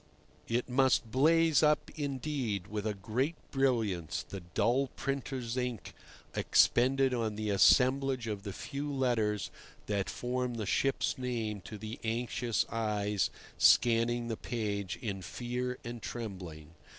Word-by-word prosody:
It 120 +2 0
must 130 -3 +2
blaze 160 +4 +4
up, 150 -1 +2
indeed, 135 - -2
with 105 +1 -3
a 105 - -1
great 125 - -1 0.2
brilliance 115 - 0
the 100 - -6
dull 120 +10 +1
printer's 135 -3 -3
ink 125 -7 -3 0.4
expended 130 +2 +3
on 115 -3 -1
the 105 0 -2
assemblage 130 +4 +4
of 105 -3 -3
the 100 0 -5
few 145 +7 -5
letters 115 -6 0 0.3
that 100 -2 -1
form 125 0 -2
the 110 -2 -3
ship's 135 +5 +1
name 115 -5 -2
to 110 - -7
the 110 +2 -7
anxious 115 0 0
eyes 105 -3 0 0.3
scanning 120 0 +4
the 115 -2 -3
page 100 -5 -3
in 100 -4 -3
fear 125 +6 -3
and 120 0 -6
trembling. 90 -11 -7
120 Hz, 130 wpm, -32 LUFS, 105-130 Hz, 0.4 s, blaze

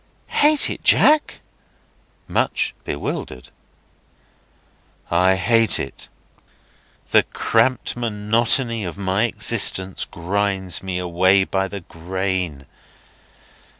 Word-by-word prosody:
"Hate 300 0 +3
it, - - -7
Jack?" 305 0 +4 0.9
(Much - - 0
bewildered.) 65 -3 -5 1.6
"I 90 +2 +3
hate 115 +3 +3
it. 70 - -7 1.0
The - - +6
cramped 120 +3 0
monotony 115 +1 0
of 90 0 -6
my 100 +3 0
existence 95 -5 0
grinds 95 0 -2
me 95 -1 -4
away 90 +2 +2
by 95 0 -2
the 100 0 -8
grain. 90 -3 -4
95 Hz, 85 wpm, -20 LUFS, 90-115 Hz, 1.6 s, The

